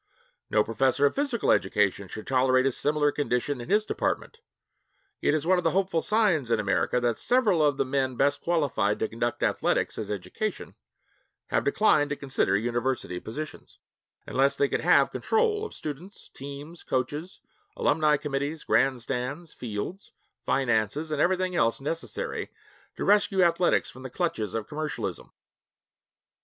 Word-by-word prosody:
No 105 Hz, -, +3 dB
professor 130 Hz, +5 st, +2 dB
of 140 Hz, -, +3 dB
physical 275 Hz, -5 st, 0 dB
education 100 Hz, 0 st, +1 dB
should 110 Hz, -, -8 dB
tolerate 130 Hz, 0 st, +3 dB
a 135 Hz, -, +3 dB
similar 150 Hz, +3 st, +1 dB
condition 140 Hz, -2 st, -1 dB
in 120 Hz, -, -9 dB
his 210 Hz, +2 st, +3 dB
department. 460 Hz, -, -2 dB, 0.8 s
It -, -, +2 dB
is 155 Hz, 0 st, -1 dB
one 185 Hz, +1 st, +4 dB
of -, -, -4 dB
the -, -, +3 dB
hopeful 190 Hz, -4 st, +1 dB
signs 195 Hz, -, +2 dB
in 115 Hz, -2 st, +2 dB
America 100 Hz, +4 st, +1 dB
that 120 Hz, -2 st, 0 dB
several 225 Hz, -10 st, +3 dB
of 145 Hz, -2 st, +2 dB
the -, -, +1 dB
men 130 Hz, -1 st, -1 dB
best 140 Hz, +3 st, +1 dB
qualified 140 Hz, -12 st, +1 dB
to 110 Hz, -, -1 dB
conduct 120 Hz, +2 st, -2 dB
athletics -, -, 0 dB
as 105 Hz, -, -5 dB
education 105 Hz, -, -4 dB, 0.8 s
have -, -, +1 dB
declined 215 Hz, -, +3 dB
to 145 Hz, -, -1 dB
consider 135 Hz, -8 st, 0 dB
university 120 Hz, -4 st, -2 dB
positions, 150 Hz, +10 st, -8 dB, 0.5 s
unless 135 Hz, +1 st, +2 dB
they 140 Hz, -, +2 dB
could -, -, -1 dB
have -, -, +4 dB
control 440 Hz, -1 st, +1 dB
of -, -, -8 dB
students, 160 Hz, +7 st, -8 dB
teams, 140 Hz, +4 st, -9 dB
coaches, 145 Hz, +7 st, -3 dB, 0.4 s
alumni 150 Hz, 0 st, +3 dB
committees, 145 Hz, +1 st, -3 dB
grandstands, 135 Hz, +4 st, -1 dB
fields, 120 Hz, -, -6 dB, 0.3 s
finances, 130 Hz, +4 st, 0 dB
and 150 Hz, -1 st, 0 dB
everything 185 Hz, 0 st, +1 dB
else 115 Hz, -6 st, +2 dB
necessary 160 Hz, +4 st, -4 dB, 0.5 s
to -, -, -3 dB
rescue 200 Hz, -2 st, +4 dB
athletics 170 Hz, +1 st, +2 dB
from 130 Hz, -, -13 dB
the 130 Hz, -, -7 dB
clutches 120 Hz, -, -2 dB
of 110 Hz, -1 st, -3 dB
commercialism. 150 Hz, +2 st, -4 dB
145 Hz, 150 wpm, -27 LUFS, 120-170 Hz, 0.8 s, one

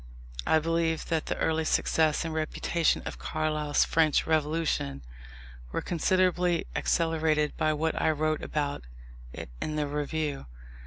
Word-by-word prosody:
I -, -, +5 dB
believe 165 Hz, 0 st, 0 dB
that 160 Hz, -2 st, 0 dB
the -, -, -2 dB
early 160 Hz, 0 st, +1 dB
success 155 Hz, 0 st, +2 dB
and 165 Hz, -, -3 dB
reputation 160 Hz, +1 st, 0 dB
of -, -, -6 dB
Carlyle's 155 Hz, -2 st, 0 dB
French 160 Hz, -2 st, +2 dB
Revolution, 155 Hz, -, 0 dB, 0.7 s
were -, -, -1 dB
considerably 180 Hz, 0 st, +1 dB
accelerated 160 Hz, -3 st, +1 dB
by 155 Hz, 0 st, +1 dB
what 160 Hz, +1 st, -1 dB
I -, -, +3 dB
wrote 155 Hz, 0 st, 0 dB
about 145 Hz, -1 st, -2 dB, 0.5 s
it -, -, -8 dB
in 155 Hz, -, -2 dB
the 150 Hz, -1 st, 0 dB
Review. 145 Hz, -, -3 dB
155 Hz, 135 wpm, -28 LUFS, 150-165 Hz, 0.7 s, I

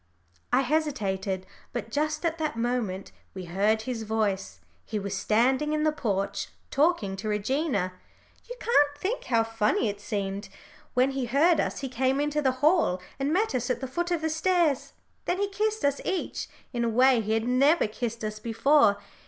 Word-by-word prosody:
I -, -, +4 dB
hesitated, 200 Hz, -11 st, -1 dB, 0.3 s
but 225 Hz, -, -4 dB
just 305 Hz, +3 st, -1 dB
at 330 Hz, 0 st, 0 dB
that 305 Hz, -6 st, -2 dB
moment 230 Hz, -5 st, -2 dB, 0.2 s
we 185 Hz, -1 st, -6 dB
heard 205 Hz, +5 st, +1 dB
his 245 Hz, -1 st, -3 dB
voice. 205 Hz, -, -1 dB, 0.2 s
He 215 Hz, -, -4 dB
was 200 Hz, -1 st, -3 dB
standing 255 Hz, +9 st, +2 dB
in 305 Hz, 0 st, +1 dB
the 310 Hz, -, +3 dB
porch 200 Hz, -9 st, -2 dB, 0.2 s
talking 280 Hz, -, +2 dB
to 215 Hz, +3 st, -5 dB
Regina. 210 Hz, -, 0 dB, 0.6 s
You -, -, -5 dB
can't 290 Hz, -11 st, +3 dB
think 400 Hz, +11 st, -2 dB
how 230 Hz, -2 st, +3 dB
funny 225 Hz, 0 st, +1 dB
it 205 Hz, 0 st, -6 dB
seemed. 200 Hz, -1 st, -3 dB, 0.5 s
When 255 Hz, +2 st, +3 dB
he 270 Hz, -2 st, -2 dB
heard 300 Hz, +8 st, +3 dB
us -, -, -1 dB
he 270 Hz, -, -2 dB
came 260 Hz, +2 st, 0 dB
into 295 Hz, +1 st, 0 dB
the 265 Hz, -3 st, +3 dB
hall 315 Hz, -, +3 dB, 0.2 s
and 275 Hz, +2 st, 0 dB
met 400 Hz, +3 st, +1 dB
us 245 Hz, -1 st, -1 dB
at 250 Hz, -, 0 dB
the 265 Hz, -, -4 dB
foot 345 Hz, +7 st, -2 dB
of 345 Hz, -2 st, 0 dB
the 320 Hz, 0 st, 0 dB
stairs. 325 Hz, -3 st, +1 dB, 0.3 s
Then 355 Hz, -, 0 dB
he 400 Hz, +1 st, 0 dB
kissed 430 Hz, -2 st, -1 dB
us 285 Hz, 0 st, +1 dB
each, 375 Hz, -1 st, -2 dB, 0.3 s
in 240 Hz, -1 st, 0 dB
a 235 Hz, -, +1 dB
way 250 Hz, +1 st, +4 dB
he 215 Hz, 0 st, -1 dB
had 225 Hz, +1 st, 0 dB
never 275 Hz, +7 st, +4 dB
kissed 230 Hz, +1 st, -4 dB
us 215 Hz, 0 st, -4 dB
before. 230 Hz, 0 st, +3 dB
250 Hz, 185 wpm, -27 LUFS, 215-305 Hz, 0.6 s, I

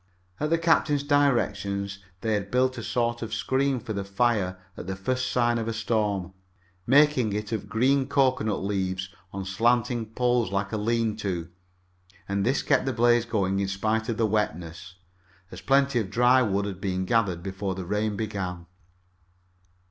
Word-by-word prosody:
Under 155 Hz, +2 st, +1 dB
the -, -, 0 dB
captain's 160 Hz, -3 st, +2 dB
directions 115 Hz, -9 st, +1 dB, 0.2 s
they 110 Hz, -1 st, 0 dB
had 100 Hz, -1 st, -2 dB
built 130 Hz, +2 st, +2 dB
a -, -, -6 dB
sort 120 Hz, -1 st, -1 dB
of 115 Hz, 0 st, -3 dB
screen 130 Hz, +5 st, 0 dB
for 110 Hz, -1 st, -5 dB
the 100 Hz, -1 st, -3 dB
fire 100 Hz, -2 st, 0 dB, 0.2 s
at -, -, -8 dB
the 95 Hz, -, -3 dB
first 130 Hz, +7 st, -2 dB
sign 120 Hz, -1 st, +2 dB
of 115 Hz, -, -3 dB
a 115 Hz, -, -1 dB
storm, 105 Hz, -5 st, -1 dB, 0.5 s
making 135 Hz, -5 st, +4 dB
it 105 Hz, +1 st, -3 dB
of 105 Hz, -3 st, -3 dB
green 130 Hz, +5 st, +2 dB
cocoanut 130 Hz, -6 st, +1 dB
tree 95 Hz, -, -2 dB
leaves 95 Hz, -2 st, -2 dB, 0.2 s
on 95 Hz, 0 st, -5 dB
slanting 115 Hz, +3 st, +1 dB
poles 120 Hz, -2 st, +1 dB
like 100 Hz, 0 st, -1 dB
a 110 Hz, -, -1 dB
"lean 115 Hz, 0 st, 0 dB
to," 90 Hz, -5 st, -3 dB, 0.8 s
and 100 Hz, 0 st, -1 dB
this 130 Hz, +6 st, +1 dB
kept -, -, +2 dB
the 130 Hz, -, 0 dB
blaze 120 Hz, 0 st, +3 dB
going 100 Hz, -4 st, 0 dB
in 100 Hz, -, 0 dB
spite 110 Hz, +4 st, -1 dB
of 115 Hz, -, -1 dB
the 115 Hz, -, +2 dB
wetness, 90 Hz, -5 st, -2 dB, 0.6 s
as -, -, -9 dB
plenty 135 Hz, -2 st, +3 dB
of 105 Hz, -4 st, -3 dB
dry 125 Hz, +4 st, +4 dB
wood 100 Hz, -3 st, 0 dB
had 95 Hz, -2 st, -6 dB
been 95 Hz, -1 st, -1 dB
gathered 95 Hz, -5 st, +1 dB
before 95 Hz, 0 st, -3 dB
the 95 Hz, -1 st, -5 dB
rain 105 Hz, +3 st, -1 dB
began. 95 Hz, -5 st, -4 dB
110 Hz, 175 wpm, -26 LUFS, 100-120 Hz, 0.8 s, making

